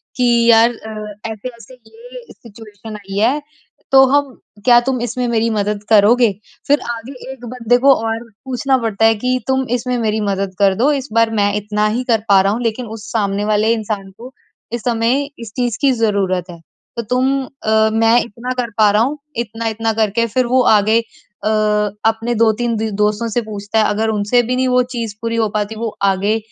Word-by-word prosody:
कि 250 - -1 0.3
यार 225 +1 +6
अ, 215 -2 -8 0.2
ऐसे-ऐसे 235 +3 -9
ये 465 - -13
सिचुएशन 215 -1 -12
आई 195 -1 -8
है, 255 +8 +2 0.5
तो 270 0 +8
हम 285 +1 +2 0.4
क्या 240 -1 +7
तुम 260 -2 0
इसमें 245 +1 -2
मेरी 230 -1 +1
मदद 210 -1 -2
करोगे? 220 +2 +5 0.4
फिर 290 +1 +4
आगे 230 +3 -7 0.2
एक 250 -2 -10
बंदे 245 -1 +1
को 275 - +8
और 225 0 -1 0.3
पूछना 265 +1 0
पड़ता 225 -2 0
है 225 0 +5
कि 255 0 0
तुम 265 0 +1
इसमें 250 +1 -2
मेरी 220 -2 -1
मदद 195 -1 -2
कर 195 -1 +3
दो, 260 +9 +2
इस 275 -2 -2
बार 230 0 +3
मैं 205 0 +2
इतना 210 0 -1
ही 235 +4 -1
कर 220 -2 +2
पा 195 -1 +6
रहा 195 +1 +1
हूँ, 235 - -3
लेकिन 230 +2 -2
उस 220 0 -9
सामने 205 -2 -1
वाले 215 +1 +2
इंसान 210 -3 -4
को, 250 +3 -11 0.4
इस 235 - -3
समय 240 +3 +1 0.2
इस 230 -2 -8
चीज़ 245 -3 -1
की 275 - +4
ज़रूरत 200 -6 0
है। 170 -1 -10 0.4
तो 235 - 0
तुम 260 +4 0
अ, 220 -5 +1
मैं 225 +1 +4
इतना 235 +3 -7
कर 235 - -5
पा 215 -1 +5
रहा 210 +2 +3
हूँ, 285 +5 -2 0.2
इतना-इतना 225 -1 -2
करके 220 +1 0
फिर 250 +3 0
वो 255 +1 +3 0.2
आगे 215 +3 +3
अ, 225 -2 -10 0.6
अपने 225 +2 0
2-3 230 +1 +1
दो 220 0 -2
दोस्तों 210 +2 0
से 240 - 0
पूछता 210 0 -3
है। 215 - +3
अगर 220 +2 0
उनसे 210 +3 +2
भी 250 +2 -1
नहीं 260 0 +1
वो 250 0 +3
चीज़ 225 -3 -4
पूरी 230 0 -2
हो 220 -2 +1
पाती, 210 +1 -3
वो 225 +1 -3
आगे 200 +3 +2
225 Hz, 195 wpm, -17 LUFS, 210-245 Hz, 0.6 s, तो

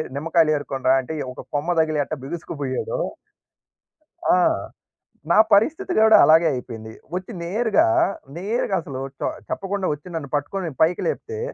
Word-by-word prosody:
నిమ్మకాయలు 160 +2 +2
ఏరుకొనిరా 135 -2 0
అంటే 130 +5 -7 0.2
ఒక - - -9
కొమ్మ 165 +5 0
తగిలి 155 -2 +1
ఎట్టా 155 - -5
బిగుసుకుబోయాడో. 155 - -4 1.4
ఆ! - - +3 0.9
నా - - +5 0.2
పరిస్థితి 315 - +2
గూడా 220 0 +7
అలాగే 165 +2 +6
అయిపోయింది. 115 -4 -6 0.2
వచ్చి 185 +5 -5
నేరుగా 220 - +2 0.5
నేరుగా 205 +1 -1
అసలు 135 -4 -7 0.2
చొ - - 0 0.2
చెప్పకుండా 195 -1 -2
వచ్చి 150 +4 -10
నన్ను 145 -4 -4
పట్టుకొని 165 +5 -2
పైకి 165 +3 +3
లేపితే, 445 -2 -4
165 Hz, 130 wpm, -22 LUFS, 145-200 Hz, 1.4 s, గూడా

